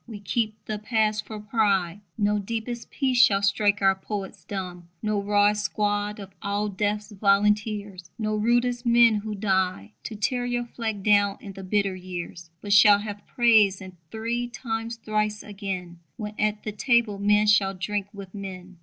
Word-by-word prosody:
We 220 -3 -8
keep 215 +2 -1
the 215 -1 -4
past 215 -1 0
for 215 -1 -7
pride: 205 -3 0 0.2
No 210 -1 +1
deepest 230 +3 -5
peace 260 -4 +2
shall 195 -3 +3
strike 205 0 +2
our 195 0 +6
poets 195 0 -6
dumb: 180 -3 -6 0.2
No 210 -1 0
rawest 205 +1 +2
squad 205 0 -1
of 195 -1 -9
all 205 +1 -1
Death's 210 +2 -2
volunteers, 205 -2 +1
No 215 -1 -1
rudest 240 +3 +1
men 235 -1 +5
who 210 0 -4
died 190 - 0
To 220 - -5
tear 245 +4 -1
your 245 0 -1
flag 220 -4 -4
down 205 -1 +3
in 200 - -9
the 195 - -9
bitter 195 0 0
years. 175 -2 -7
But 205 -1 -1
shall 200 0 +8
have 205 0 -7
praise, 220 -5 +4
and 185 -2 -10
three 230 +3 -2
times 230 -1 -4
thrice 215 -1 -2
again, 190 -4 -6 0.2
When 210 -2 -5
at 210 0 0
the 215 - -3
table 225 -1 +1
men 210 +1 +3
shall 205 -2 +3
drink 200 +1 -3
with 200 -3 -10
men. 185 -3 -8
210 Hz, 170 wpm, -25 LUFS, 195-220 Hz, 0.2 s, shall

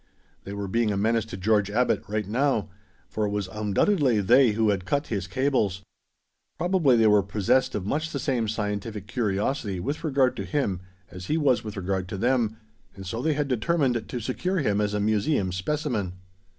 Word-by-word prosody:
They 100 - -6
were 100 -1 -4
being 115 +2 +1
a 100 - -1
menace 110 +2 +1
to 110 -4 -7
George 105 +1 +2
Abbot, 125 +4 +1
right 105 -1 -2
now, 115 -2 0 0.4
for 110 -1 -1
it - - -2
was 100 -2 -2
undoubtedly 110 - +1
they 120 +3 +5
who 110 0 +2
had 95 -2 -2
cut 145 +9 -1
his 95 -2 -2
cables. 110 -6 0 0.7
Probably 175 -8 +3
they 115 - +4
were 105 -1 +5
possessed 110 +7 +1
of 100 -3 -3
much 155 +9 -1
the - - -4
same 125 -6 0
scientific 105 -1 -3
curiosity 105 -1 -1
with 140 - -3
regard 135 -5 +2
to - - -3
him 135 - -1 0.3
as 90 +1 -8
he 155 - +1
was 140 -6 +2
with 105 -1 -7
regard 95 0 -2
to 100 - -4
them, 115 -1 +1 0.4
and 95 - -9
so 115 +6 -4
they 155 +3 +1
had 145 0 -1
determined 130 -1 0
to 125 - -4
secure 155 - -2
him 105 - +1
as 105 0 -1
a - - 0
museum 105 0 +1
specimen. 100 -1 -2
110 Hz, 190 wpm, -26 LUFS, 100-130 Hz, 0.7 s, they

